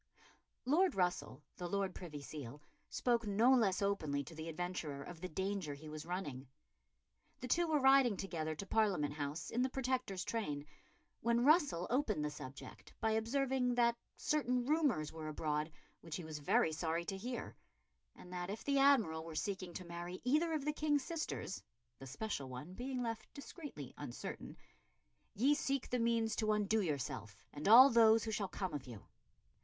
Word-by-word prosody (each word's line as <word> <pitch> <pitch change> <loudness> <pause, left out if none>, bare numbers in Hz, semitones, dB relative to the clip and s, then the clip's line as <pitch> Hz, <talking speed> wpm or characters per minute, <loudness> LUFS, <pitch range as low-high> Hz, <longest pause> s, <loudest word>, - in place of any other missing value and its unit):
Lord 340 +8 +3
Russell, 175 -6 -1
the 175 -1 -4
Lord 195 0 -1
Privy 150 -6 -8
Seal, 145 -2 -7 0.3
spoke 235 -3 +1
no 225 +6 +5
less 205 -6 +3
openly 155 -8 0
to 140 - -11
the 160 +1 -6
adventurer 165 -4 -4
of 170 0 -10
the 185 - -4
danger 190 -4 -2
he 155 +2 -10
was 155 +1 -7
running. 145 -8 -4 0.9
The 250 - -5
two 340 +7 +2
were 310 -2 +2
riding 265 -5 +5
together 160 -5 -3
to 195 - -6
Parliament 195 -9 +1
House 150 +1 -4
in 240 - 0
the 260 - +2
Protector's 255 -8 -1
train, 150 -12 -3 0.5
when 235 +1 +2
Russell 290 - +4
opened 225 - +1
the 150 - -2
subject 140 -2 -10
by 220 -1 +1
observing 250 +2 +1
that 235 -1 +4 0.2
certain 250 -5 +1
rumours 280 - +1
were 160 -1 -6
abroad 155 0 -2 0.3
which 165 -2 -7
he 180 - -5
was 155 -1 -6
very 145 +2 +3
sorry 165 +1 -1
to 195 - -3
hear, 240 +5 -5 0.6
and 180 - -12
that 180 0 -4
if 210 +3 -5
the 280 -1 +2
Admiral 225 - +4
were 165 -1 -8
seeking 190 0 -3
to 185 - -6
marry 175 +1 -6
either 310 +6 +2
of 300 -3 -2
the 300 - +1
King's 295 -2 +1
sisters 310 - -4 0.4
the 135 - -9
special 140 - -4
one 130 +8 -7
being 250 +3 -3
left 230 -1 -4
discreetly 280 - -8
uncertain 135 -5 -6 0.8
"ye 265 +8 +4
seek 275 -2 -1
the 250 - +1
means 230 -1 +1
to 215 -1 +2
undo 210 +1 +2
yourself 130 - -4
and 150 +4 -4
all 240 +5 +11
those 225 -1 +6
who 225 - -3
shall 210 -2 -1
come 185 -2 -4
of 145 -3 -5
you." 115 -5 -9
195 Hz, 175 wpm, -36 LUFS, 155-245 Hz, 0.9 s, all